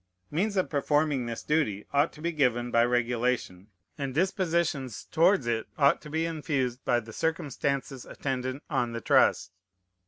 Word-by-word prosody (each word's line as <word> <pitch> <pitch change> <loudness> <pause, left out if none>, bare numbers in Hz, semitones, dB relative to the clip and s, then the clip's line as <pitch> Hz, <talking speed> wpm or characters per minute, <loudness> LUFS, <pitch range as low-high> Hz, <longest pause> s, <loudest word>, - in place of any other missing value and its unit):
Means 200 +6 0
of 185 - +2
performing 145 -3 +1
this 115 -1 -5
duty 140 -10 0
ought 145 +3 +3
to 150 - -12
be 170 - 0
given 120 -5 +1
by 115 - +4
regulation; 120 -5 -1 0.3
and 135 -2 -3
dispositions 170 - 0
towards 170 -2 +3
it 115 -1 -1
ought 140 -2 +4
to 150 - -10
be 160 +2 0
infused 140 -6 -2
by 120 - +2
the 110 -1 -11
circumstances 140 -4 -2
attendant 130 +1 -4
on 125 -6 -1
the 115 - -4
trust. 90 - +3
135 Hz, 155 wpm, -28 LUFS, 120-160 Hz, 0.3 s, by